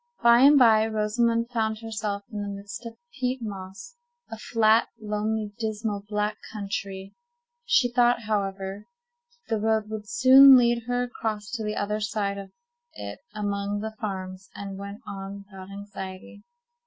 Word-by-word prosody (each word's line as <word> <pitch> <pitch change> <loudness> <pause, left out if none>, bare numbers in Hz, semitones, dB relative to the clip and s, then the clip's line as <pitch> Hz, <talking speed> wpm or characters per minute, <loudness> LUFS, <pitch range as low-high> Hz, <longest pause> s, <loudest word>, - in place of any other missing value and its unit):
By 235 0 +7
and 285 +3 +7
by, 220 -4 +6
Rosamond 230 +2 0
found 220 -2 0
herself 210 -2 -3
in 210 -1 -4
the 205 - -4
midst 200 +3 -7
of 230 - -8
a 240 +2 -24
peat 255 0 0
moss—a 365 - -9
flat, 220 0 +3
lonely, 210 0 -2
dismal, 215 -2 -2
black 210 0 -1
country. 195 -2 -5 0.5
She 275 - +4
thought, 240 -1 +3
however, 195 -1 -3 0.6
that 225 - 0
the 210 - -3
road 220 -1 +1
would 210 -1 -6
soon 260 +2 +9
lead 235 -1 +2
her 245 0 0
across 220 -3 -4
to 235 -4 -3
the 210 0 -2
other 210 +1 -1
side 205 -2 -2
of 195 -1 -9 0.5
it - - -7 0.2
among 205 -1 -2
the 220 0 -5
farms, 190 -2 -5
and 195 -1 -6
went 200 +1 -8
on 200 0 -7
without 190 -1 -11
anxiety. 195 0 -8
215 Hz, 155 wpm, -26 LUFS, 200-235 Hz, 0.6 s, soon